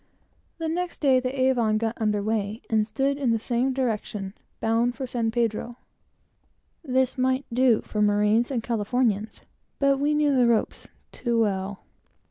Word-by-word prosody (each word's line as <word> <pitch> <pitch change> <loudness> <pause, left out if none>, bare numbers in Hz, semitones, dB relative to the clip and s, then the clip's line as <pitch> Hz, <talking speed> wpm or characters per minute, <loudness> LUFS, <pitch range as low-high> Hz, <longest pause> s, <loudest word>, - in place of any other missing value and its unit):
The 325 -1 -3
next 350 +2 -3
day 265 -3 +4
the 255 +1 -4
Avon 240 -5 +2
got 225 +1 -2
under 210 -2 +1
weigh, 215 0 -2
and 215 -1 +2
stood 275 +5 -1
in 265 -4 +1
the 230 - +3
same 240 +4 0
direction, 215 -6 -3 0.3
bound 230 +2 +1
for 265 - -4
San 235 -2 -1
Pedro. 235 +1 -2 1.1
This 260 -2 0
might 260 +1 +1
do 250 -2 +4
for 210 - -3
marines 210 +3 +3
and 245 -5 -2
Californians, 220 -1 -1 0.4
but 275 -1 +2
we 295 +1 +1
knew 295 -2 +2
the 250 -2 +4
ropes 230 -2 0 0.2
too 235 -2 -1
well. 195 -2 -1
235 Hz, 155 wpm, -25 LUFS, 215-260 Hz, 1.1 s, day